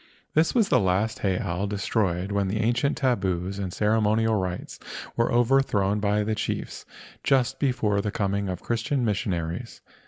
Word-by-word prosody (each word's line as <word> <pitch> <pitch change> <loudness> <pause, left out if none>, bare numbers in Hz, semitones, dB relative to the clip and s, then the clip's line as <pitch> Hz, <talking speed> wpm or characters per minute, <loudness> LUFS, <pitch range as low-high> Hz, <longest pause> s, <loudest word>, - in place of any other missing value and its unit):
This 160 +7 +2
was 225 -5 +3
the - - +4
last 100 +3 +1
heiau 95 0 -1
destroyed 95 -2 -1
when 100 -1 +1
the 100 +3 -1
ancient 120 +6 +1
tabus 95 -7 0
and 95 -2 -3
ceremonial 110 +2 +2
rites 95 -4 -3 0.4
were 115 - +1
overthrown 120 -5 +2
by 105 0 +1
the 110 +1 -1
chiefs 110 - -4 0.4
just 135 -1 +2
before 120 -7 +1
the 105 - -2
coming 100 -1 -1
of 90 -1 -5
Christian 120 +3 0
missionaries. 95 0 -2
105 Hz, 150 wpm, -26 LUFS, 95-120 Hz, 0.4 s, the